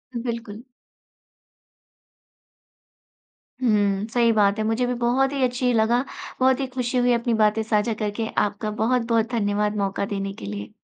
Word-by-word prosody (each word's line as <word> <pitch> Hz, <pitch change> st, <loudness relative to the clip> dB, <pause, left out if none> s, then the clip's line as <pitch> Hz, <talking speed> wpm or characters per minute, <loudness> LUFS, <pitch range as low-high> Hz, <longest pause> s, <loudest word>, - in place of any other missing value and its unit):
बिल्कुल। 230 Hz, -2 st, -5 dB, 3.0 s
हुँ, 205 Hz, -3 st, +2 dB
सही 235 Hz, -1 st, +4 dB
बात 205 Hz, -2 st, +3 dB
है। -, -, +1 dB
मुझे 225 Hz, +3 st, +1 dB
भी 250 Hz, -, 0 dB
बहुत 245 Hz, +3 st, +1 dB
ही 275 Hz, -, 0 dB
अच्छी 250 Hz, 0 st, +1 dB
लगा, 230 Hz, +3 st, +2 dB, 0.4 s
बहुत 260 Hz, +1 st, +3 dB
ही 270 Hz, -, -1 dB
खुशी 250 Hz, 0 st, -1 dB
हुई 245 Hz, 0 st, +3 dB
अपनी 235 Hz, 0 st, 0 dB
बातें 215 Hz, 0 st, +2 dB
साझा 215 Hz, +1 st, +1 dB
करके। 215 Hz, +2 st, -2 dB
आपका 210 Hz, +1 st, 0 dB
बहुत-बहुत 230 Hz, +1 st, +1 dB
धन्यवाद 210 Hz, -2 st, 0 dB
मौका 200 Hz, 0 st, -1 dB
देने 195 Hz, -1 st, -4 dB
के 100 Hz, -, -10 dB
लिए। 100 Hz, 0 st, -6 dB
225 Hz, 145 wpm, -23 LUFS, 210-245 Hz, 3.0 s, सही